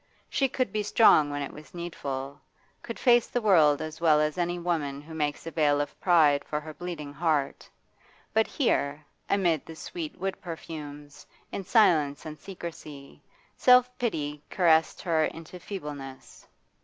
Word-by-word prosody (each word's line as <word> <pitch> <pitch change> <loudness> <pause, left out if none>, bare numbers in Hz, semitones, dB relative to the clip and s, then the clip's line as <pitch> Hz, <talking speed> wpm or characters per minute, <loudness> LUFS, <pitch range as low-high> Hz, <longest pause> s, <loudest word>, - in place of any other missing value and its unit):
She 270 -1 +1
could 255 -2 -2
be 215 - 0
strong 205 -8 +5
when 145 0 -3
it 140 - -7
was 150 +3 -13
needful, 140 -5 -5 0.4
could 230 - -7
face 240 -2 +4
the 245 - -1
world 160 -10 +4
as 155 +1 -8
well 155 -3 +5
as 150 0 0
any 175 0 -1
woman 160 -5 -2
who 155 +3 -12
makes 150 -1 -2
a 165 - -5
veil 145 -3 +2
of 145 - -4
pride 155 -6 +4
for 150 - -3
her 155 +1 -9
bleeding 150 -4 -7
heart; 150 -3 -1 0.6
but 220 0 +3
here, 145 - 0 0.2
amid 175 -7 +2
the 160 - -10
sweet 160 -1 -7
wood 195 +1 -3
perfumes, 150 -4 -9 0.2
in 195 - -4
silence 165 - +3
and 155 -1 -8
secrecy, 155 -6 -9 0.3
self 250 0 +5
pity 150 -11 -2
caressed 160 -3 +2
her 160 -3 +2
into 165 +2 -8
feebleness. 145 -8 -8
160 Hz, 155 wpm, -27 LUFS, 145-180 Hz, 0.6 s, strong